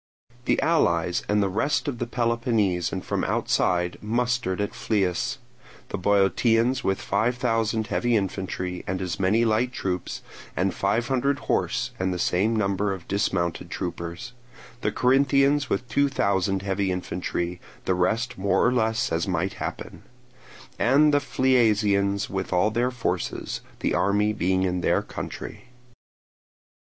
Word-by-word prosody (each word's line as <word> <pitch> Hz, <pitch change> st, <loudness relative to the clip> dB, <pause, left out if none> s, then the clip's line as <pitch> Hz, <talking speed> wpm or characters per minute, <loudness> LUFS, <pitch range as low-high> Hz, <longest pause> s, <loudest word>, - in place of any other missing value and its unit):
The -, -, +2 dB
allies 90 Hz, -, +2 dB
from 105 Hz, 0 st, 0 dB
the 100 Hz, -, +2 dB
rest 110 Hz, +12 st, 0 dB
of 125 Hz, -5 st, -3 dB
Peloponnese 115 Hz, -7 st, 0 dB
and 95 Hz, -, -4 dB
from -, -, -1 dB
outside 90 Hz, 0 st, 0 dB
mustered 115 Hz, -3 st, 0 dB
at 105 Hz, +1 st, -2 dB
Phlius; 95 Hz, -6 st, -1 dB, 0.5 s
the -, -, -3 dB
Boeotians 115 Hz, +6 st, +2 dB
with 95 Hz, -, 0 dB
five 115 Hz, +5 st, 0 dB
thousand 115 Hz, -2 st, 0 dB
heavy 120 Hz, +2 st, 0 dB
infantry 95 Hz, -2 st, -3 dB
and 95 Hz, +1 st, -2 dB
as 90 Hz, -3 st, -3 dB
many 105 Hz, +5 st, +3 dB
light 115 Hz, +3 st, +1 dB
troops, 90 Hz, -7 st, -4 dB, 0.3 s
and 95 Hz, +1 st, +1 dB
five 110 Hz, +5 st, 0 dB
hundred 135 Hz, +2 st, +1 dB
horse -, -, 0 dB
and 95 Hz, 0 st, 0 dB
the 90 Hz, -, -2 dB
same 100 Hz, +6 st, +1 dB
number 100 Hz, -1 st, 0 dB
of 95 Hz, -3 st, -6 dB
dismounted 85 Hz, -4 st, -1 dB
troopers; 85 Hz, +7 st, -5 dB, 0.5 s
the -, -, 0 dB
Corinthians 140 Hz, +2 st, +3 dB
with 125 Hz, +6 st, -1 dB
two 140 Hz, +5 st, +2 dB
thousand 95 Hz, -5 st, 0 dB
heavy 95 Hz, -1 st, 0 dB
infantry; 90 Hz, -1 st, -3 dB, 0.2 s
the 95 Hz, -, +2 dB
rest 110 Hz, +7 st, 0 dB
more 100 Hz, +1 st, +2 dB
or 125 Hz, -, +3 dB
less 115 Hz, +1 st, +1 dB
as 80 Hz, +3 st, 0 dB
might 90 Hz, +1 st, -1 dB
happen; -, -, -5 dB, 0.8 s
and 145 Hz, +4 st, +4 dB
the 145 Hz, -, +5 dB
Phliasians 105 Hz, -7 st, +2 dB
with 95 Hz, -1 st, -4 dB
all 90 Hz, +4 st, +2 dB
their 120 Hz, +3 st, +1 dB
forces, 115 Hz, -8 st, -3 dB, 0.2 s
the -, -, 0 dB
army 100 Hz, +4 st, +2 dB
being 95 Hz, -2 st, +1 dB
in 90 Hz, -1 st, 0 dB
their -, -, +2 dB
country. -, -, -7 dB
100 Hz, 140 wpm, -25 LUFS, 95-120 Hz, 0.8 s, the